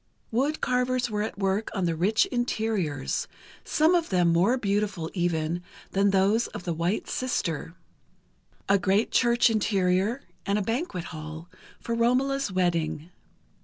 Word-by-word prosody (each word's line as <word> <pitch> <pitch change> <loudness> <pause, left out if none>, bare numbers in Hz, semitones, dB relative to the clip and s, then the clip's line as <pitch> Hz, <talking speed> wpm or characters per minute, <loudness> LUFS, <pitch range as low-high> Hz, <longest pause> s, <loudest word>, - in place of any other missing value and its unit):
Wood 275 +7 0
carvers 250 -1 0
were 210 0 -1
at 215 - -4
work 195 +2 0
on 190 -3 0
the 165 -1 0
rich 195 +7 +3
interiors, 220 - -1 0.4
some 315 +3 +3
of 345 -2 +1
them 180 -3 +3
more 195 +10 +3
beautiful, 200 -6 -1
even, 170 -2 -1 0.3
than 200 +1 +3
those 200 +4 +3
of - - -9
"The 175 - -2
White 170 +6 -1
Sister": 170 - -2 0.9
a 200 0 +4
great 195 +4 +1
church 240 0 +4
interior, 200 +2 +1 0.2
and 200 0 0
a 210 - 0
banquet 225 - -2
hall, 155 +2 -8 0.3
for 235 - -4
Romola's 255 +2 +1
wedding. 170 -3 -1
200 Hz, 140 wpm, -27 LUFS, 175-235 Hz, 0.9 s, a